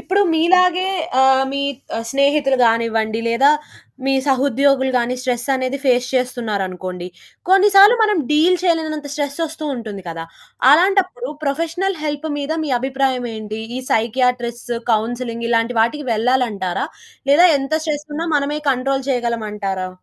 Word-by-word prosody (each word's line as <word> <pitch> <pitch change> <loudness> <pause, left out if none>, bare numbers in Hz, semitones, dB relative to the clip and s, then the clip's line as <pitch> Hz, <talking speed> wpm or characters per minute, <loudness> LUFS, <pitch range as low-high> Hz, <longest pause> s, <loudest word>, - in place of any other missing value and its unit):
ఇప్పుడు 390 +2 0
మీలాగే 365 +2 +3 0.4
ఆహ్, 265 0 +4
మీ 280 - -2 0.5
స్నేహితులు 280 0 +2
గానివ్వండి 225 -1 +1
లేదా, 250 +5 +4 0.6
మీ 270 - +2
సహోద్యోగులు 270 0 +2
గాని 245 +1 0
స్ట్రెస్ 245 -2 -2
అనేది 260 +1 -2
ఫేస్ 250 -1 +2
చేస్తున్నారు 240 -5 -1
అనుకోండి. 180 -1 -7 0.4
కొన్ని 390 +2 +5
సార్లు 405 +4 +8
మనం 420 -3 +2
డీల్ 320 +5 +4
చేయలేనంత 315 -4 -1
స్ట్రెస్ 285 -2 -3
వస్తూ 315 0 -7
ఉంటుంది 215 -6 -7
కదా. 165 0 -6 0.5
అలాంటప్పుడు 385 - +2 0.2
ప్రొఫెషనల్ 335 +6 -1
హెల్ప్ 295 +1 -3
మీద 290 +2 -3
మీ 295 - -4
అభిప్రాయం 260 -1 -1
ఏంటి? 215 0 -6 0.2
ఈ - - -4
సైకియాట్రిస్ట్, 240 +1 -1 0.2
కౌన్సెలింగ్ 235 +1 -2
ఇలాంటి 230 +1 +1
వాటికి 260 +5 0
వెళ్ళాలంటారా? 220 -5 0 0.4
లేదా 330 +6 +7
ఎంత 270 +2 -5
స్ట్రెస్ 300 -2 -3
ఉన్నా 330 +3 -3
మనమే 290 +1 -2
కంట్రోల్ 270 +1 -2
చేయగలమంటారా? 210 -6 -2
265 Hz, 130 wpm, -19 LUFS, 230-300 Hz, 0.6 s, సార్లు